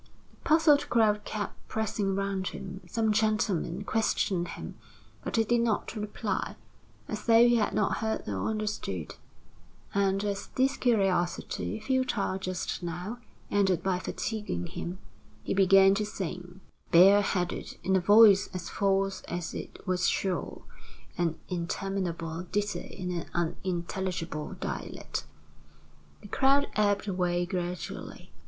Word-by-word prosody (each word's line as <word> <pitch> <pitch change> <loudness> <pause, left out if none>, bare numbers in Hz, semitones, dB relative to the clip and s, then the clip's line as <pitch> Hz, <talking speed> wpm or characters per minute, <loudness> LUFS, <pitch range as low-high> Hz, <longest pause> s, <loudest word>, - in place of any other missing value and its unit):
The - - -26
puzzled 310 -2 +5
crowd 210 -3 +3
kept 210 -1 -5
pressing 205 -3 -1
round 195 -1 -1
him. 190 0 -6
Some 220 -2 +1
gentlemen 210 -4 +1
questioned 195 -4 0
him, - - -7 0.5
but - - -3
he 225 - +4
did 235 +2 +2
not 230 -1 0
reply, 210 -1 -3 0.5
as 210 0 -5
though 230 +1 +7
he 240 0 +4
had 210 - 0
not 205 - +1
heard 220 0 -2
or 100 -3 -2
understood; 210 - -3 0.8
and 195 0 +2
as 200 -1 -2
this 265 +1 +2
curiosity, 180 - 0
futile 255 -8 0
just 185 0 -3
now, 180 +7 -5 0.3
ended 190 -4 +2
by 190 -2 +1
fatiguing 210 - -3
him, 175 - -5 0.5
he - - -1
began 195 0 +6
to 210 +2 0
sing, 180 -2 -6 0.3
bareheaded, 185 0 +4
in 190 +2 +2
a - - +5
voice 205 +1 +7
as 180 -1 -4
false 195 -1 +1
as 175 -1 -4
it - - -8
was 180 -2 +1
shrill, 190 -2 -2 0.5
an 165 -2 0
interminable 170 -2 -3
ditty 205 +1 -2
in 180 -1 -3
an 170 -2 -3
unintelligible 175 -2 -2
dialect. - - -5 1.0
The - - -9
crowd 275 +6 +3
ebbed 205 -1 +2
away 180 -2 0
gradually. 175 -1 -5
195 Hz, 130 wpm, -29 LUFS, 180-210 Hz, 1.0 s, though